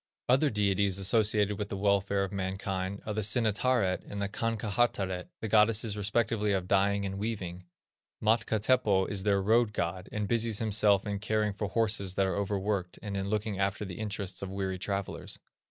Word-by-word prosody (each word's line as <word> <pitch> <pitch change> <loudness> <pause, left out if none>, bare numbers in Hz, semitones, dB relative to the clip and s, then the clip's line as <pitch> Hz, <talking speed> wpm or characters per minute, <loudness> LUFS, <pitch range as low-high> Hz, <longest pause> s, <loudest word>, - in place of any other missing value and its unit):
Other 135 +4 +4
deities 100 -3 +1
associated 105 +1 +2
with 105 -1 -3
the 100 - -4
welfare 100 0 +1
of 95 - -4
mankind 95 0 -3
are 105 - -3
the 110 - -1
Sinettaret 110 -1 +1
and 100 - -5
Kankahattaret, 100 -3 -1
the 110 - -2
goddesses 110 0 +3
respectively 105 0 0
of 95 -2 -1
dyeing 100 +1 +2
and 95 0 -4
weaving. 95 -5 -4 0.5
Matka 110 0 +2
Teppo 105 -4 +2
is 100 0 -2
their 100 -1 +1
road 110 +1 +3
god, 90 -1 -3
and 105 -1 -2
busies 115 -1 +1
himself 105 -2 +3
in 100 -1 -3
caring 105 0 0
for 105 +1 -3
horses 100 -3 0
that 95 - +2
are 95 - -1
over 100 0 -1
worked, 95 -2 -2
and 100 -2 -4
in 100 0 -2
looking 105 -1 -2
after 100 +2 -1
the 95 0 -8
interests 100 -3 -3
of 95 - -4
weary 95 -1 -3
travellers. 100 0 -4
100 Hz, 175 wpm, -30 LUFS, 95-110 Hz, 0.5 s, Other